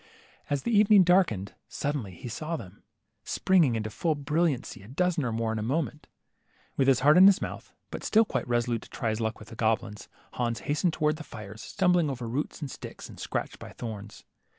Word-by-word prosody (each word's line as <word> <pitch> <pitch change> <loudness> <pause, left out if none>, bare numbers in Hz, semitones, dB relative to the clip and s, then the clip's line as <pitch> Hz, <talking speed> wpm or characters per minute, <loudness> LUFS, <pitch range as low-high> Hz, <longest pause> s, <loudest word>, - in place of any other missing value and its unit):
As 145 -1 -1
the 235 - +1
evening 205 -1 +7
darkened, 170 - +2
suddenly 135 -11 -3
he 120 - -8
saw 155 +8 -4
them, 100 - -10 0.4
springing 170 -10 +3
into 110 -1 -3
full 160 +8 0
brilliancy, 145 - -1
a 100 - -13
dozen 170 +4 0
or 120 - -1
more 115 0 -1
in 110 - -2
a - - -3
moment. 150 +6 -2 0.7
With 135 - +2
his 135 -2 +4
heart 150 +5 +6
in 190 - +10
his 200 - +6
mouth, - - -6 0.2
but - - -6
still 220 +1 +4
quite - - -3
reso 120 0 +1
lute 115 -2 -1
to - - -14
try 115 - -2
his 110 +1 -2
luck 110 -1 -1
with 105 - -13
the 115 - -10
goblins, 110 -2 -1 0.2
Hans 120 -2 -2
hastened 155 +4 0
towards 155 0 +1
the - - -6
fires, 110 -4 -9
stumbling 180 - +2
over 125 -3 -4
roots 140 +8 -3
and 140 -3 -4
sticks, - - -9
and - - -12
scratched - - -4
by - - -10
thorns. 105 -3 -8
130 Hz, 210 wpm, -28 LUFS, 110-165 Hz, 0.7 s, in